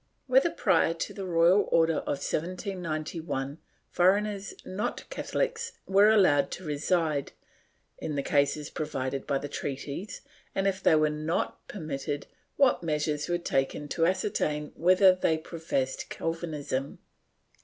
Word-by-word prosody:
Whether, - - +4
prior 165 - +2
to 165 - -4
the 195 -2 -5
royal 175 +3 +4
order 165 -1 +4
of 140 - -3
1791, 165 -5 -3 0.3
foreigners 200 +2 +2
not 190 +3 -3
Catholics 480 -2 -2
were 200 +2 +5
allowed 185 -10 +4
to 185 - -7
reside, 155 -1 0 0.7
in 150 - -3
the 140 - -1
cases 145 +1 +1
provided 135 -3 -3
by 140 - +1
the 145 - -4
treaties 145 +6 -5 0.3
and, 195 - 0
if 195 -1 0
they - - +5
were 155 -1 +3
not 155 +3 -2
per 205 - -8
mitted, 145 -2 -4 0.3
what 275 -3 +4
measures 150 -2 -1
were 175 - +2
taken 145 -3 -1
to 165 +3 +2
ascertain 155 -5 -1
whether 185 +2 +6
they 165 -3 +1
professed 155 -5 -3
Calvinism 155 -5 -3
165 Hz, 135 wpm, -28 LUFS, 145-185 Hz, 0.7 s, whether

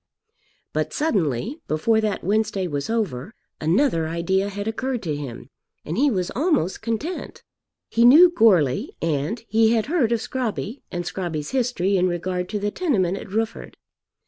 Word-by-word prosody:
But - - -1
suddenly, 215 - -1
before 220 +9 +2
that 215 -2 -2
Wednesday 205 0 0
was 145 -2 -3
over, 205 - -2 0.2
another 165 - +2
idea 190 +4 0
had 205 +1 -5
occurred 250 +2 -2
to 155 -4 -2
him, 130 -3 -8 0.3
and 160 - -3
he 285 +5 +3
was 185 -7 -1
almost 280 - 0
content. 230 +11 -4 0.4
He 230 - +2
knew 315 +9 +8
Goarly, 180 - +3
and 165 - -2
he 225 +1 +3
had 225 -2 +1
heard 285 -7 +1
of 235 - +2
Scrobby 235 0 -4
and 175 -1 -3
Scrobby's 165 -6 -4
history 230 -7 +1
in 180 0 +3
regard 180 +1 -2
to 210 - -2
the 205 0 -2
tenement 205 - 0
at 195 0 -8
Rufford. 220 +2 -3
205 Hz, 155 wpm, -23 LUFS, 170-235 Hz, 0.4 s, knew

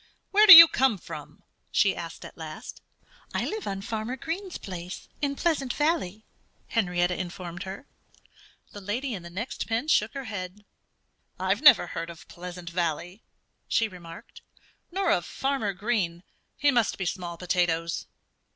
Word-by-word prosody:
"Where 425 +2 +6
do 385 - +14
you 330 0 +13
come 260 -7 +2
from?" - - -10 0.3
she - - +2
asked - - -8
at - - -11
last. - - -9 0.5
"I - - 0
live 435 0 -4
on 195 0 -4
Farmer 225 +3 -4
Green's 350 +6 -5
place, 180 -2 -8
in 280 -1 -1
Pleasant 285 -6 0
Valley," 295 - -1 0.4
Henrietta 180 -4 +1
informed 175 -1 -6
her. 195 +8 -8 0.9
The 205 - -10
lady 235 +7 -3
in 195 - -5
the 170 - -10
next 230 +9 -5
pen 230 +6 -1
shook 225 -5 +2
her 275 - -4
head. 205 -2 -7 0.7
"I've 190 +4 0
never 300 - +8
heard 165 0 -5
of 170 -1 -12
Pleasant 175 0 -9
Valley," 175 +3 -3 0.5
she 225 - +2
remarked, 170 -4 -12 0.5
"nor 385 +2 +1
of 175 - +2
Farmer 265 -1 -2
Green. 190 -4 -2 0.3
He 290 -1 +3
must 235 -4 +1
be 190 - -3
small 175 -1 -4
potatoes." 170 -2 -1
200 Hz, 150 wpm, -27 LUFS, 180-265 Hz, 0.9 s, do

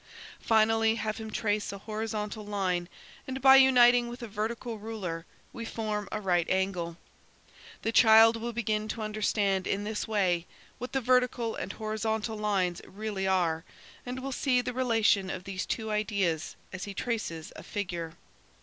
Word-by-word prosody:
"Finally, 225 0 +3
have 215 -1 -3
him 220 -1 -6
trace 210 -1 -1
a 200 - -6
horizontal 215 0 -4
line, 185 -4 -1 0.4
and 265 0 -4
by 265 0 +8
uniting 245 -2 +6
with 240 +1 -8
it - - -2
a - - -8
vertical 225 +2 -4
ruler 195 -7 -5 0.3
we 235 - -6
form 215 -3 -3
a - - -2
right 180 -4 +1
angle. 180 -3 -1 0.9
The 225 - 0
child 225 0 +7
will 230 +1 -4
begin 215 -2 -1
to 220 0 -4
understand, 205 -3 0
in 200 +1 -1
this 210 0 -3
way, 185 -5 +1 0.3
what 250 - -6
the 270 - +1
vertical 250 -2 +2
and - - -4
horizontal 220 0 -2
lines 195 -5 0
really 200 -1 -3
are, 170 -4 +1 0.4
and 250 +1 -5
will 270 +1 -4
see 255 -1 +2
the 245 0 -2
relation 225 -6 +2
of 185 -1 -5
these 195 -1 -4
two 220 -1 -2
ideas 200 -6 -1 0.2
as 185 - -5
he 200 -1 -7
traces 190 -10 -3
a - - -8
figure. 175 -5 -4
215 Hz, 165 wpm, -29 LUFS, 195-230 Hz, 0.9 s, by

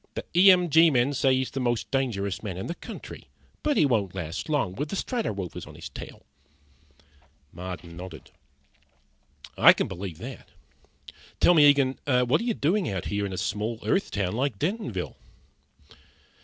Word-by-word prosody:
"The - - -4
E 185 +3 +8
M 180 -1 +3
G 165 +2 +7
men 130 0 +2
say 135 -1 +3
he's 130 0 -1
the 135 - -4
most 120 -2 -1
dangerous 105 -8 -1
man 95 -5 -5
in 95 - -5
the 170 - -3
country. - - -10 0.3
But 295 -4 +1
he 155 - +5
won't 105 -9 0
last 90 - -5
long 145 -12 0
with 145 +9 -4
the - - -3
Strato 235 +3 -2
Rovers 95 -4 -6
on - - -12
his - - -8
trail." - - -10 1.3
Marden 90 -2 -8
nodded. 90 -5 -10 1.3
"I - - +9
can - - -2
believe 90 -3 -6
that. - - -9 0.9
Tell 175 - +6
me, 150 -3 +7
Eagen, 135 -2 +2
what 125 +2 +3
are - - -3
you 235 -3 0
doing 180 - +1
out 95 -3 -3
here 100 0 0
around 95 - -4
a - - -5
small 105 +5 -2
Earth 195 - +1
town 95 -3 -2
like 125 -1 -1
Dentonville?" 155 - -3
125 Hz, 175 wpm, -26 LUFS, 95-150 Hz, 1.3 s, I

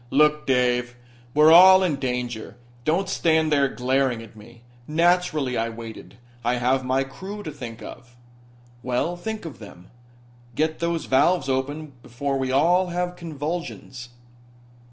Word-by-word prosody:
"Look, 150 +2 +2
Dave, 125 -1 +1 0.4
we're 155 +1 +6
all 185 +2 +8
in 160 -6 0
danger. 125 -4 -4 0.3
Don't 175 +5 +1
stand 160 -4 +1
there 140 -2 +3
glaring 130 -2 0
at 110 - -15
me. 115 +2 -16 0.2
Naturally 160 -4 +1
I 115 0 -1
waited. 115 -1 -10 0.3
I 120 +1 +1
have 130 +2 +1
my 130 +1 +1
crew 190 +10 -8
to 155 - -6
think 120 -5 -9
of." 120 0 -11 0.7
"Well, 125 +8 -1
think 215 +3 -6
of 160 - -8
them. 90 -4 -13 0.6
Get 155 +2 0
those 170 -1 -2
valves 155 +4 +2
open 140 +3 -3
before 135 +3 -3
we 130 -1 -1
all 175 +7 +3
have 180 0 -3
convulsions." 155 -6 -6
140 Hz, 140 wpm, -23 LUFS, 125-170 Hz, 0.7 s, all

